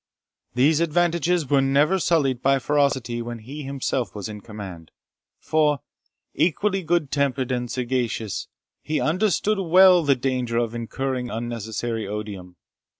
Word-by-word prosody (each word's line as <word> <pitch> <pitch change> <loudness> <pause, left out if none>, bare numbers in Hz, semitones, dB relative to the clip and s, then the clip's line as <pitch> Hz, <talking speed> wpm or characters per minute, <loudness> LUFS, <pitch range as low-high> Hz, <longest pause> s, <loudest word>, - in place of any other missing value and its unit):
These 145 +5 +4
advantages 170 0 +1
were 140 0 +3
never 145 +7 +3
sullied 140 -8 +1
by 135 0 +3
ferocity 135 -4 0
when 120 0 -5
he 135 +7 -8
himself 135 -3 -3
was 100 -2 -5
in 105 -1 -8
command; 95 -7 -9 0.5
for, 150 -2 +1 0.5
equally 195 +3 +1
good 170 -4 0
tempered 135 -2 0
and 125 -1 -2
sagacious, 120 -4 -2 0.3
he 155 - -2
understood 200 +4 +1
well 185 0 +6
the 145 -3 +3
danger 125 -2 -1
of 120 -1 0
incurring 125 +2 -3
unnecessary 115 -1 -4
odium. 100 -4 -6
135 Hz, 130 wpm, -23 LUFS, 115-155 Hz, 0.5 s, well